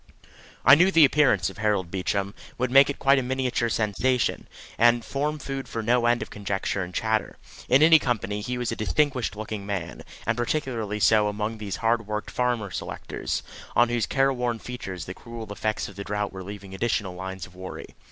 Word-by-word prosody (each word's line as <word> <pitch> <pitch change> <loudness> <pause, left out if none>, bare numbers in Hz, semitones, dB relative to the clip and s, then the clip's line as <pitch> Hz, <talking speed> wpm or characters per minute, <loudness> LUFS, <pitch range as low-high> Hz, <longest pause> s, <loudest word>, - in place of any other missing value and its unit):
I - - +9
knew 175 +6 +6
the 165 -5 +7
appearance 135 - +3
of - - -14
Harold 100 -5 0
Beecham, 100 +1 -1 0.2
would 125 0 -1
make 140 +1 +6
quite 140 0 +4
a - - 0
miniature 125 -2 -1
sensation, 115 +4 0 0.3
and 120 0 +4
form 150 +2 -2
food 135 -2 -5
for 115 - -4
no 120 +1 +3
end 120 0 +2
of - - -12
conjecture 100 -1 -2
and 90 -1 -5
chatter. 110 +3 -1 0.3
In 130 +4 +6
any 160 0 +8
company 105 -6 -2
he 125 +3 -3
was 120 -2 -2
a - - -2
distinguished 130 0 0
looking 110 -1 -5
man, 100 -2 -4 0.2
and - - +1
particularly 120 -5 -2
so 105 0 +4
among 105 +2 -3
these 100 -3 -4
hard 115 -1 0
worked 105 0 -4
farmer 120 -5 -1
selectors, - - -4 0.3
on 120 0 +5
whose 120 -2 0
careworn 125 -3 +1
features 95 -8 -7
the 90 - -6
cruel 115 0 -9
effects 110 +1 -2
of 100 - -12
the 100 - -4
drought 105 0 -3
were 95 - -7
leaving 100 0 -9
additional 100 -2 -1
lines 95 0 -6
of 90 - -17
worry. 95 0 -8
110 Hz, 190 wpm, -25 LUFS, 100-125 Hz, 0.3 s, I